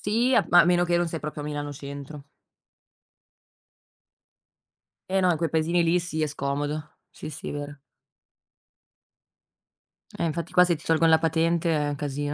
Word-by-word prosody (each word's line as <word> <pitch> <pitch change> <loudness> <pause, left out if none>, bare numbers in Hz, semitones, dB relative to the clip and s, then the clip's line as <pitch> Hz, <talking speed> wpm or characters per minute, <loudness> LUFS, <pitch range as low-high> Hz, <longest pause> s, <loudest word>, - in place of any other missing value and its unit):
Sì, 230 +5 +1 0.2
ma 175 - +8
a - - +5
meno 175 0 +3
che 175 0 +1
non 175 0 +1
sei 165 - -4
proprio 150 0 -6
a - - -7
Milano 145 -1 -4
centro. 140 0 -9 2.9
E 190 0 +1
no, 185 - +3
in 165 - 0
quei 165 0 -1
paesini 165 +2 +1
lì 170 +2 +2
sì, 170 -2 -4
è 155 - +1
scomodo. 145 +1 -4 0.2
Sì, 155 - -9
sì, 150 - -7
vero. 145 0 -6 2.4
Eh - - +1
infatti 165 +1 -3
qua 180 - +6
se 175 -1 +1
ti 155 - -13
tolgono 165 0 +3
la 160 - +6
patente 165 +1 +1
è 150 -1 0
un 145 - -3
casino. 145 0 -3
160 Hz, 165 wpm, -25 LUFS, 145-170 Hz, 2.9 s, ma